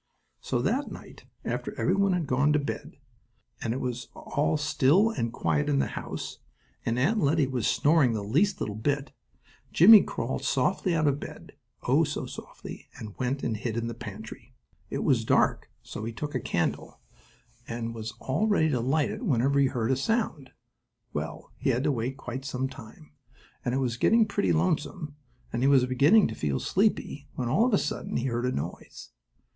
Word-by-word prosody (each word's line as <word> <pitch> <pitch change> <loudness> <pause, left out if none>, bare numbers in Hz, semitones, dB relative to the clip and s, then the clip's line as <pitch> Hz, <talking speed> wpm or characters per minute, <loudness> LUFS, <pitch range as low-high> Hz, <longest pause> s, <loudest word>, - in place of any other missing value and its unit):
So 120 - -1
that 260 - 0
night, - - -11 0.2
after - - -4
every - - +2
one 200 -1 +3
had 175 -3 0
gone 140 +3 +2
to - - +4
bed, 140 - -5 0.6
and 115 - -1
it 125 - -2
was 125 -1 -4
all 150 +2 0
still 150 +8 +3
and 115 - -2
quiet 80 -8 0
in 70 - +2
the 70 - +1
house, - - -6 0.4
and 115 +1 -1
Aunt 195 - +2
Lettie 150 -3 +3
was 130 -4 -1
snoring 145 -5 +3
the 105 -2 -2
least 165 - +1
little 105 - -2
bit, 140 +5 -1 0.6
Jimmie 210 +5 +9
crawled - - -3
softly 180 -3 +1
out 155 -1 +2
of 145 -1 +2
bed. - - -9 0.3
Oh, - - +3
so - - -3
softly, - - -10
and 105 -2 -8
went 130 +2 -1
and 110 - 0
hid 110 +1 -3
in 115 - -1
the 115 - -3
pantry. 110 -1 -9 0.3
It - - -2
was - - +3
dark, - - +2
so 105 - -7
he 115 - -3
took 145 +6 -5
a 130 - 0
candle 85 -7 -2 0.7
and 115 0 -4
was 110 -1 -6
all 155 +12 0
ready 180 -7 +3
to 130 -5 0
light 140 +5 +1
it - - -6
whenever 140 - +2
he 140 - +5
heard 120 -1 -1
a - - +3
sound. 150 - -1 0.6
Well, - - -5
he - - -1
had 125 +3 +1
to 150 - +2
wait 130 +1 -2
quite 130 -1 -6
some 135 -1 -2
time, 110 - -13 0.5
and 125 - -1
it - - +1
was 120 -3 -1
getting 225 - +4
pretty 95 - 0
lonesome, 145 - -1 0.4
and 120 - -1
he 135 - +4
was 135 -3 +5
beginning 145 - +5
to - - -5
feel 70 -9 -1
sleepy 185 -7 0
when, 125 - -2
all 205 - +3
of 250 - -1
a - - +4
sudden, - - -3
he 120 - -1
heard 120 -1 -1
a - - 0
noise! 70 - -6
130 Hz, 195 wpm, -28 LUFS, 115-150 Hz, 0.7 s, Jimmie